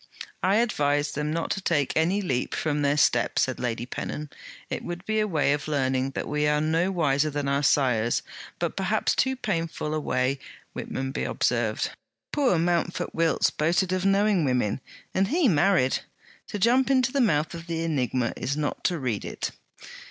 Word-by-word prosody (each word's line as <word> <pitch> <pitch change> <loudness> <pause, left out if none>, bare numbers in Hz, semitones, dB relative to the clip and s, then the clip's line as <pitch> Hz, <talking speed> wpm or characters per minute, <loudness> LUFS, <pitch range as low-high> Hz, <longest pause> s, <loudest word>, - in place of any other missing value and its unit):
'I 190 +2 +3
advise 145 -10 +1
them 150 +1 -2
not 165 +1 -2
to 195 - -1
take 155 -6 0
any 180 +6 +2
leap 130 -8 -1
from 150 -2 -1
their 145 0 +2
step,' - - +2
said - - +1
Lady 120 -1 -2
Pennon. 150 +3 -5 0.4
'It - - -4
would 175 +1 -6
be 220 0 0
a 215 - +1
way 155 -6 +2
of 145 +1 -3
learning 130 -3 0
that - - -3
we 150 0 0
are 150 0 +2
no 165 +4 +1
wiser 155 -4 +2
than 145 -1 -3
our 140 0 +1
sires; 125 -5 +2 0.3
but - - -2
perhaps - - +1
too 265 0 +1
painful 165 -9 -2
a 155 - 0
way,' 130 -1 0 0.4
Whitmonby 135 +1 -3
observed. - - 0 0.4
'Poor 270 - +2
Mountford 175 +1 0
Wilts 165 0 +2
boasted 175 +4 +1
of 185 0 0
knowing 195 -2 +3
women; 125 -4 0 0.3
and 190 +1 +2
he 315 - +2
married. 175 - +3 0.5
To - - -4
jump 245 +6 +3
into 260 -1 +3
the 275 - +1
mouth 155 -9 +2
of 170 0 -8
the 165 -1 -2
enigma, 130 -6 0
is 140 +3 -2
not 150 -1 -2
to 175 - +2
read 125 -8 -2
it.' - - -4
155 Hz, 180 wpm, -26 LUFS, 140-185 Hz, 0.5 s, I